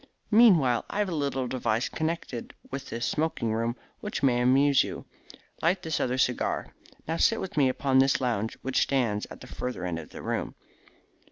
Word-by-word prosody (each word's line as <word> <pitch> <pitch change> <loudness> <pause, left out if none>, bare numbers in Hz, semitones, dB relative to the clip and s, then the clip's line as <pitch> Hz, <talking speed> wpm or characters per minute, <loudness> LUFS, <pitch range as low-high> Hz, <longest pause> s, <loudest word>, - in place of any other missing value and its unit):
Meanwhile, 175 - +5
I - - -4
have 205 -2 +1
a - - -3
little 135 -3 -1
device 120 -2 0
connected 160 -7 -4 0.2
with 135 0 -5
this 120 +1 -3
smoking 150 -8 -1
room 115 +1 -1 0.2
which 210 -8 -4
may 125 -3 +3
amuse 135 +2 +5
you. - - -7 0.6
Light 180 +3 +1
this 160 -1 -1
other 125 0 0
cigar. 125 -1 0 0.3
Now 165 +1 -1
sit 225 - +3
with 190 - -5
me 140 -3 +4
upon 130 0 +2
this 135 +1 +4
lounge 115 -4 -1
which 130 0 +1
stands 115 -7 0
at - - -11
the - - -9
further 125 -8 -5
end 85 -2 -2
of 80 - -10
the - - -10
room." - - -3
130 Hz, 185 wpm, -27 LUFS, 120-155 Hz, 0.6 s, Meanwhile